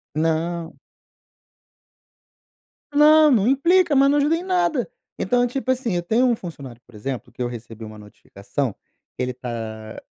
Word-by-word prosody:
Não. 165 Hz, +1 st, -2 dB, 2.1 s
Não, 305 Hz, +1 st, +6 dB
não 220 Hz, -4 st, +3 dB
implica, 335 Hz, +5 st, +3 dB
mas 275 Hz, +1 st, +5 dB
não 290 Hz, -, +3 dB
ajuda 295 Hz, +3 st, +2 dB
em 340 Hz, -, -4 dB
nada. 345 Hz, -, 0 dB, 0.3 s
Então, 245 Hz, +5 st, +1 dB
tipo 260 Hz, +2 st, -4 dB
assim, 245 Hz, -6 st, -1 dB
eu 175 Hz, -, 0 dB
tenho 225 Hz, +9 st, +2 dB
um 245 Hz, -2 st, +3 dB
funcionário, 140 Hz, -, -10 dB
por 120 Hz, -, -19 dB
exemplo, 125 Hz, +2 st, -6 dB
que -, -, -10 dB
eu 120 Hz, -, 0 dB
recebi 115 Hz, -2 st, -9 dB
uma 110 Hz, 0 st, -11 dB
notificação 105 Hz, +4 st, -5 dB, 0.4 s
que -, -, -5 dB
ele 125 Hz, 0 st, -2 dB
tá 110 Hz, -3 st, -7 dB
175 Hz, 155 wpm, -22 LUFS, -, 2.1 s, Não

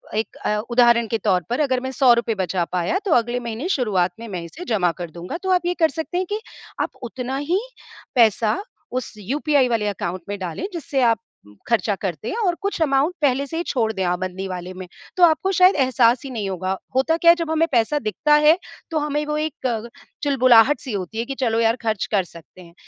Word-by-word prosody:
एक 220 Hz, +1 st, -2 dB
अ, 210 Hz, -, +1 dB
उदाहरण 235 Hz, -1 st, +4 dB
के 225 Hz, -, -1 dB
तौर 185 Hz, -4 st, +1 dB
पर 245 Hz, -, -1 dB
अगर 265 Hz, -4 st, +1 dB
मैं 260 Hz, -, -4 dB
₹100 240 Hz, -4 st, +3 dB
बचा 185 Hz, -2 st, -1 dB
पाया, 180 Hz, -, 0 dB
तो 385 Hz, -, -1 dB
अगले 240 Hz, -1 st, +1 dB
महीने 235 Hz, +5 st, -4 dB
शुरुआत 205 Hz, -, +1 dB
में 230 Hz, -, -8 dB
मैं 185 Hz, -5 st, -5 dB
इसे 315 Hz, -, -9 dB
जमा 180 Hz, -5 st, +2 dB
कर 175 Hz, -, -5 dB
दूँगा।" 175 Hz, -, -6 dB
तो 380 Hz, -, -2 dB
आप 360 Hz, -2 st, +2 dB
ये 355 Hz, -, +1 dB
कर 320 Hz, -1 st, +4 dB
सकते 320 Hz, +5 st, -4 dB
हैं 370 Hz, -, 0 dB
कि 420 Hz, +1 st, -2 dB, 0.4 s
आप -, -, 0 dB
उतना 250 Hz, +2 st, -4 dB
ही 330 Hz, +7 st, 0 dB, 0.6 s
पैसा 225 Hz, -2 st, +4 dB, 0.4 s
उस -, -, -9 dB
यूपीआई 275 Hz, +5 st, +1 dB
वाले 225 Hz, -3 st, 0 dB
अकाउंट 185 Hz, -2 st, -3 dB
में 205 Hz, -, -3 dB
डालें, 185 Hz, -, -4 dB
जिससे 290 Hz, -5 st, -2 dB
आप 230 Hz, -3 st, +3 dB, 0.5 s
खर्चा 225 Hz, -3 st, +1 dB
करते 195 Hz, +1 st, -3 dB
हैं -, -, -3 dB
और 350 Hz, -, +1 dB
कुछ 400 Hz, -4 st, -2 dB
अकाउंट 285 Hz, +3 st, +2 dB
पहले 280 Hz, -1 st, +2 dB
से 325 Hz, -, -5 dB
ही 340 Hz, -, -1 dB
छोड़ 225 Hz, -5 st, 0 dB
दें 190 Hz, -, -2 dB
आप 175 Hz, 0 st, 0 dB
बंदी 185 Hz, +1 st, -4 dB
वाले 180 Hz, 0 st, -6 dB
में। 185 Hz, 0 st, -8 dB, 0.3 s
तो 360 Hz, -, +4 dB
आपको 345 Hz, +3 st, +4 dB
शायद 370 Hz, +1 st, +5 dB
एहसास 255 Hz, -2 st, +3 dB
ही -, -, -5 dB
नहीं 210 Hz, -5 st, -3 dB
होगा। 185 Hz, +1 st, -2 dB, 0.2 s
होता 300 Hz, +5 st, +2 dB
क्या 335 Hz, 0 st, +7 dB
है, -, -, +4 dB
जब 335 Hz, -2 st, -3 dB
हमें 320 Hz, +1 st, +2 dB
पैसा 250 Hz, +4 st, +2 dB
दिखता 220 Hz, +7 st, 0 dB
है, 300 Hz, +2 st, +5 dB, 0.3 s
तो 320 Hz, -, 0 dB
हमें 295 Hz, 0 st, -1 dB
वो 300 Hz, 0 st, -2 dB
एक 310 Hz, -1 st, -2 dB
कग 235 Hz, -1 st, -3 dB, 0.3 s
चुलबुलाहट-सी 255 Hz, -1 st, +4 dB
होती 195 Hz, +2 st, -4 dB
है 230 Hz, -, -1 dB
कि, 275 Hz, -, -5 dB
"चलो 230 Hz, -4 st, 0 dB
यार, 225 Hz, 0 st, +3 dB
खर्च 220 Hz, -3 st, -1 dB
कर 200 Hz, -3 st, +2 dB
सकते 170 Hz, +2 st, -15 dB
हैं।" 170 Hz, -1 st, -15 dB
240 Hz, 225 wpm, -22 LUFS, 205-295 Hz, 0.6 s, क्या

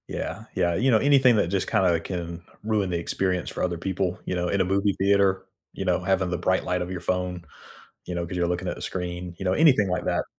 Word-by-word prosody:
Yeah, 100 Hz, +6 st, -5 dB
yeah, 85 Hz, -2 st, +2 dB
you 125 Hz, +7 st, +2 dB
know, 110 Hz, -, +6 dB
anything 130 Hz, -1 st, +5 dB
that 100 Hz, -, +2 dB
just 95 Hz, +1 st, -1 dB
kinda 90 Hz, -3 st, +3 dB
can 85 Hz, -2 st, -5 dB, 0.2 s
ruin 105 Hz, -3 st, 0 dB
the 85 Hz, -, -1 dB
experience 90 Hz, +2 st, -1 dB
for -, -, -4 dB
other 90 Hz, -2 st, -1 dB
people, 95 Hz, 0 st, -2 dB
you -, -, -2 dB
know, 90 Hz, 0 st, -1 dB
in 100 Hz, +1 st, +1 dB
a -, -, +2 dB
movie 100 Hz, +2 st, +1 dB
theater, 95 Hz, -1 st, +3 dB, 0.3 s
you 95 Hz, -, -5 dB
know, 90 Hz, -1 st, +2 dB
having 95 Hz, -1 st, +1 dB
the 90 Hz, -, -1 dB
bright 95 Hz, +1 st, +1 dB
light 90 Hz, 0 st, -1 dB
of 90 Hz, +1 st, -4 dB
your 90 Hz, -, -4 dB
phone, 90 Hz, -1 st, -2 dB, 0.6 s
you 90 Hz, -, -5 dB
know, 85 Hz, -1 st, -2 dB
'cause 90 Hz, +2 st, -6 dB
you're 85 Hz, -1 st, +1 dB
looking 90 Hz, +1 st, -2 dB
at -, -, -2 dB
the -, -, -9 dB
screen, 90 Hz, -1 st, -4 dB
you -, -, -5 dB
know, 95 Hz, -, +2 dB
anything 130 Hz, -, +4 dB
like 90 Hz, -, -1 dB
that. -, -, 0 dB
90 Hz, 250 wpm, -25 LUFS, 90-100 Hz, 0.6 s, know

